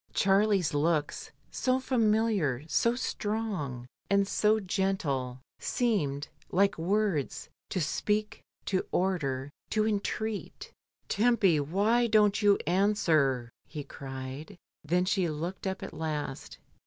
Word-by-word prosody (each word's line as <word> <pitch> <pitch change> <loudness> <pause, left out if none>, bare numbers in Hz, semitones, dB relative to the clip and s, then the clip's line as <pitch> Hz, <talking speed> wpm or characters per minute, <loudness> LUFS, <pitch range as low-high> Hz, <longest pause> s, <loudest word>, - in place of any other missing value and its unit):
Charlie's 195 -3 +3
looks, 150 0 0 0.2
so 255 0 +1
familiar, 215 - +1
so 235 +8 +2
strong, 205 - -3 0.2
and 200 0 +3
so 215 +2 +2
gentle, 165 -10 -1 0.2
seemed, 150 - 0 0.2
like 200 +2 +3
words, 190 -4 0 0.2
to 185 - -1
speak, 210 +7 -1 0.2
to 190 -2 0
order, 145 -8 -1 0.2
to 215 -1 +1
entreat 215 0 -3 0.4
"Tempy, 205 -7 +3
why 205 +11 +2
don't 210 -1 +3
you 205 -1 +5
answer?" 160 - +2 0.2
he 150 -2 -6
cried. 135 +6 -8 0.3
Then 175 +4 +1
she 185 -2 +1
looked 170 +6 -4
up 190 +1 -3
at 195 - -7
last. 150 -3 -4
190 Hz, 110 wpm, -29 LUFS, 150-210 Hz, 0.4 s, you